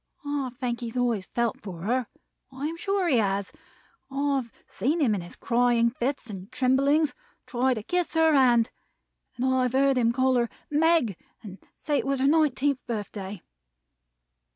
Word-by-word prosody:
I 285 -2 -2
think 245 -2 -2
he 240 - -5
has 230 - -6
always 235 -6 0
felt 235 -1 -1
for 180 -5 -8
her. 245 +3 0 0.4
I 265 +2 -5
am 320 +2 -2
sure 390 +1 0
he 275 -7 +3
has. 200 -2 0 0.6
I've 275 -3 -1
seen 300 +7 -1
him 255 -8 +3
in 200 - -2
his 175 - -9
crying 235 -1 +2
fits 260 +1 -3
and 195 -2 -8
tremblings, 275 +4 +2 0.3
try 255 +1 +1
to 220 - -5
kiss 355 +5 -1
her 320 -1 +4
hand; 240 -4 +4 0.6
and 250 +1 -2
I 260 0 +2
have 250 -1 0
heard 270 -1 +3
him 230 -1 +3
call 260 +1 +2
her 235 -1 +1 0.2
'Meg,' 300 - +3 0.3
and 195 -2 -10 0.2
say 295 -2 0
it - - -3
was 275 -1 0
her 265 - +2
nineteenth 285 -2 +2
birthday. 205 -4 -5
255 Hz, 175 wpm, -26 LUFS, 230-280 Hz, 0.6 s, her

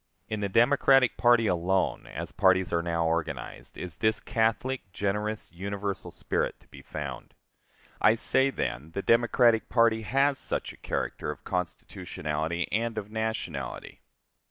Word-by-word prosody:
In 110 - -3
the 100 -1 -1
Democratic 130 +3 +4
party 120 -1 +4
alone, 95 0 0
as - - -6
parties 95 -2 +3
are 85 - +2
now 85 -1 0
organized, 80 -6 -3
is 90 -4 -6
this 110 -1 +2
catholic, 115 0 -1
generous, 105 +2 -2
universal 100 +2 -4
spirit - - -2
to - - -25
be - - -12
found. 70 -5 -7 0.7
I 110 +2 +6
say, 130 +3 +3
then, 75 - -4
the 100 - -3
Democratic 115 -1 +4
party 115 -2 +3
has 135 +6 +2
such - - -3
a - - -17
character - - -3
of - - -6
constitutionality 80 -2 -3
and 115 +1 -1
of 105 0 -5
nationality. 110 - -4
105 Hz, 140 wpm, -28 LUFS, 85-115 Hz, 0.7 s, I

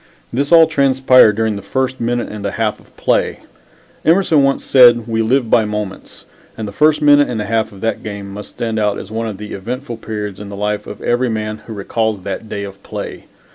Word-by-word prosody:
This 140 +5 -1
all 165 -1 +8
transpired 130 -6 +4
during 110 -1 0
the - - -6
first 130 +6 -2
minute 120 +1 -1
and 105 -1 -7
a 100 - -1
half 110 0 -2
of - - -23
play. - - 0 0.6
Emerson 165 -2 +4
once 135 0 +1
said, 120 -3 +6
"We 115 -1 0
live 120 +2 +1
by 110 - +4
moments," 105 -2 -6 0.3
and 110 -1 -4
the - - -6
first 150 +4 +2
minute 145 -1 +5
and 120 -3 -3
a 105 - -2
half 110 +1 0
of 100 -1 -13
that 115 - -1
game 100 -2 -7
must 105 +1 -8
stand 115 -2 -3
out 105 -1 +1
as 100 - -8
one 115 +1 -2
of 105 -3 -5
the 105 +1 -8
eventful 120 +4 -5
periods 105 -3 -5
in 105 -1 -8
the 100 - -7
life 105 +1 -2
of - - -9
every 120 +1 +1
man 110 -1 -3
who 115 - -6
recalls 105 0 -2
that 100 +3 -5
day 100 - -4
of 100 0 -9
play. - - -7
110 Hz, 220 wpm, -17 LUFS, 105-130 Hz, 0.6 s, all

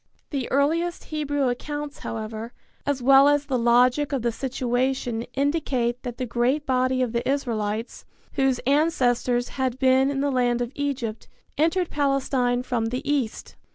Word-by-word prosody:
The 270 -4 -2
earliest 330 +6 +1
Hebrew 290 -3 -1
accounts, 290 +4 -4
however, 220 +1 -5 0.3
as 275 -3 -1
well 270 +2 +7
as 290 0 +2
the 260 -3 -1
logic 245 +5 +3
of 270 -4 -1
the 235 - +1
situation 250 -1 -1
indicate 270 -4 0
that 245 -2 -6
the 255 - -2
great 250 +5 0
body 255 0 +1
of 240 -2 -3
the 235 +2 -1
Israelites, 225 -5 -2 0.3
whose 270 -2 +2
ancestors 250 -4 +2
had 260 -2 -2
been 265 +1 +4
in 280 -1 -2
the 285 0 +1
land 245 -2 +1
of 240 0 -2
Egypt, 265 -6 -3 0.3
entered 330 +3 +1
Palestine 270 -3 +1
from 235 -3 -1
the 250 +3 -4
east. 275 -6 -2
260 Hz, 155 wpm, -24 LUFS, 245-285 Hz, 0.3 s, well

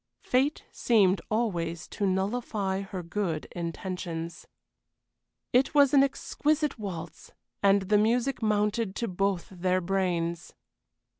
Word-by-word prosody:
Fate 270 +4 +1
seemed 195 -6 +3
always 175 -7 -1
to 200 - -1
nullify 195 0 -1
her 195 -2 -6
good 170 -3 -2
intentions. 170 -1 -5 1.1
It 260 +4 +3
was 285 -2 +6
an 280 - +7
exquisite 295 0 0
waltz, 170 -6 -7 0.3
and 200 0 +4
the 205 +2 +3
music 240 +5 +1
mounted 210 -1 +1
to 235 - -2
both 195 -1 -1
their 185 0 0
brains. 175 -2 -1
195 Hz, 115 wpm, -28 LUFS, 180-230 Hz, 1.1 s, an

